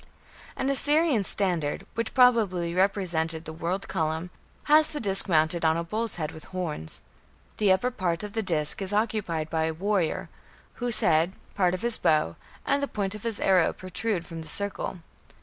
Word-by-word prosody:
An 265 - -2
Assyrian 290 -3 +2
standard, 175 -7 0
which 230 -1 -3
probably 210 -9 +3
represented 170 -4 0
the 160 - -7
"world 170 +4 -3
column", 160 0 -2 0.3
has 305 +1 +6
the 300 - -5
disc 195 -1 +2
mounted 160 +1 +2
on 160 0 +3
a 170 - -2
bull's 215 +5 -1
head 155 -3 -3
with 160 - -12
horns. 160 - -6 0.5
The 205 -3 +3
upper 190 +7 +2
part 180 -5 -2
of 205 -1 -7
the 225 - -1
disc 160 -4 +1
is 195 +1 -3
occupied 205 -8 -1
by 160 -1 +1
a 160 0 -2
warrior, 190 -2 -1 0.5
whose 240 -2 +2
head, 165 +3 +3 0.2
part 180 -2 +2
of 185 - -8
his 235 -1 +5
bow, 150 - +2 0.3
and 280 - +1
the 280 - -1
point 200 -5 -3
of 210 - -8
his 230 -2 -2
arrow 185 -3 +3
protrude 185 0 -3
from 165 -1 -8
the 160 - -10
circle. 200 0 -2
185 Hz, 180 wpm, -26 LUFS, 165-215 Hz, 0.5 s, has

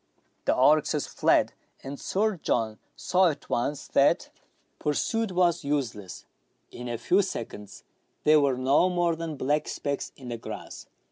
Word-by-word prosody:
The - - +3
oryxes 150 +2 +3
fled, - - +2 0.3
and 135 +1 -7
Sir 210 0 0
John 110 -8 -1 0.2
saw 185 -1 +3
at 150 - -7
once 140 +4 -1
that - - +3 0.5
pursuit 220 +8 0
was 175 -2 +2
useless; 120 -10 -3 0.5
in 125 0 -7
a 120 - -2
few 180 - +3
seconds 110 - -6 0.4
they 155 0 +6
were 140 -3 +2
no 135 +8 +3
more 175 -2 +1
than 160 -2 -5
black 145 +3 0
specks 140 -1 -3
in 130 -3 -10
the 120 - -3
grass. - - -8
145 Hz, 145 wpm, -27 LUFS, 125-175 Hz, 0.5 s, they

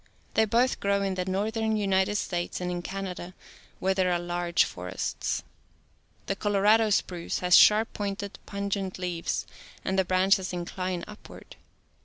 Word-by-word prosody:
They 220 - +4
both 240 +4 +2
grow 200 0 +1
in 195 -1 0
the 185 -1 -2
northern 220 +3 0
United 195 0 +1
States 175 -4 -2
and 180 0 -2
in 175 0 -3
Canada 185 -1 -6 0.4
where 190 +1 +1
there 185 -1 +1
are 175 - +2
large 175 0 +1
forests. 90 +1 -3 0.8
The 195 - -1
Cciorado 210 +2 +3
spruce 180 -4 -1
has 180 0 +5
sharp 215 +2 +6
pointed, 200 -1 -4
pungent 200 -1 -3
leaves 175 -2 -2 0.4
and 190 0 +1
the - - +4
branches 185 +1 +2
incline 180 0 -3
upward. 210 0 -12
190 Hz, 145 wpm, -27 LUFS, 180-205 Hz, 0.8 s, sharp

